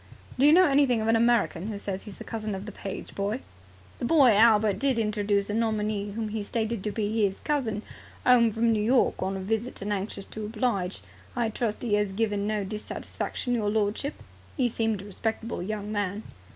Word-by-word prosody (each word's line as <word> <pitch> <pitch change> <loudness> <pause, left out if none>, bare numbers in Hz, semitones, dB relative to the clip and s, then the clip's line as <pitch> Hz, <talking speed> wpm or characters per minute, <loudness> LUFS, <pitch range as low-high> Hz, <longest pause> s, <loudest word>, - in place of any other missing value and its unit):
"Do 280 - +7
you - - +8
know 365 +3 +7
anything 275 -5 +3
of 220 - -1
an 225 - +5
American 225 -6 +2
who 215 -2 -4
says 195 -1 -4
he - - -8
is 195 - -11
the - - -8
cousin 215 -3 -4
of 190 +1 -6
the 215 - -6
page 195 -1 -7
boy?" 205 +6 -2 0.6
"The - - -2
boy 275 -3 +6
Albert 215 -2 +5
did 270 -3 +2
introduce 205 -2 +1
a 210 - -3
nominee 210 -2 -1
whom 220 0 -3
he 215 0 -3
stated 220 0 -2
to 210 - -1
be 215 +1 0
'is 195 - -7
cousin 240 -8 -1 0.4
'ome 240 -2 +6
from 230 +2 +2
New 215 - +1
York 245 +4 +2
on 190 +1 -1
a - - -4
visit 220 +5 -2
and 205 +1 -1
anxious 195 0 -3
to 220 - -7
oblige. 210 -4 -1 0.3
I 240 -2 +1
trust 220 0 -2
he 210 -4 +2
'as 205 -2 0
given 205 -1 0
no 210 -1 0
dissatisfaction, 215 +4 -4
your 215 -4 +1
lordship? 215 +7 -1 0.4
He 250 -3 +2
seemed 225 -3 -1
a - - -11
respectable 220 +1 -3
young 210 +2 -4
man." 205 0 -2
215 Hz, 205 wpm, -27 LUFS, 205-230 Hz, 0.6 s, you